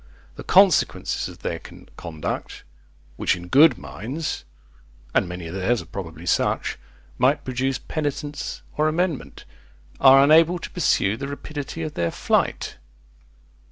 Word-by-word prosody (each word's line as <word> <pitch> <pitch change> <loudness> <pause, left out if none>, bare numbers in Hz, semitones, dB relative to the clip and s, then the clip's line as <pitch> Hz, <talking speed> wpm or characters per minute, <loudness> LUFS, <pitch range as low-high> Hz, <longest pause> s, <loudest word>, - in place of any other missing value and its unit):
The - - -8
consequences 190 -4 +3
of - - -14
their - - -2
conduct, 80 -2 -7 0.5
which - - +1
in 90 0 -10
good 145 - +6
minds, 135 - -5 0.7
(and 90 - +2
many 90 -1 -6
of 80 - -7
theirs 95 +5 +1
are - - -17
probably 80 -1 -8
such,) 85 - 0 0.4
might 135 +4 +2
produce 130 +1 -1
penitence 145 -1 -4
or 155 +1 +3
amendment, 155 - -2 0.5
are 135 0 +8
unable 165 +4 +5
to 170 - -8
pursue 110 - +1
the 140 - -5
rapidity 145 +2 -6
of 155 -1 -4
their 85 -1 0
flight. - - 0
135 Hz, 130 wpm, -23 LUFS, 95-155 Hz, 0.7 s, are